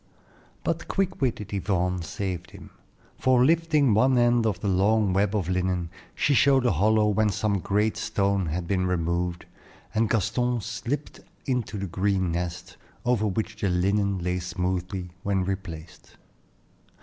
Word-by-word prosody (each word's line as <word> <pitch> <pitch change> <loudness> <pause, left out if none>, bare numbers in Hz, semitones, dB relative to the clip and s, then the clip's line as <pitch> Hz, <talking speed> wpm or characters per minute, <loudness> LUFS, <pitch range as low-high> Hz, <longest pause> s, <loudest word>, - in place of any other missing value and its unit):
But 165 0 -2
quick 190 -4 -1
witted 110 -6 -1
Yvonne 90 -2 0
saved 90 +1 -4
him; - - -13 0.5
for 130 -1 +4
lifting 155 -5 +3
one 130 +4 +4
end 120 -1 +3
of 100 -5 -1
the 100 - -3
long 100 +1 +2
web 100 +2 +1
of 95 -6 -1
linen, 90 -2 -1 0.2
she 145 - +2
showed 135 -1 +4
a 120 - +4
hollow 105 +5 +3
whence 105 -2 +1
some 100 -2 0
great 105 +4 0
stone 100 -3 0
had 85 +2 -3
been 90 -1 +1
removed, 85 0 -1 0.5
and 110 0 +1
Gaston 120 +3 +1
slipped 140 +8 -4 0.3
into 125 -6 -2
the 100 - -3
green 95 0 0
nest, 85 0 -4 0.3
over 120 -3 +2
which 110 +2 -3
the 100 - +1
linen 100 +2 +1
lay 90 0 -1
smoothly 90 0 -3
when 100 -2 0
replaced. 90 -4 -7
100 Hz, 150 wpm, -26 LUFS, 90-110 Hz, 0.5 s, for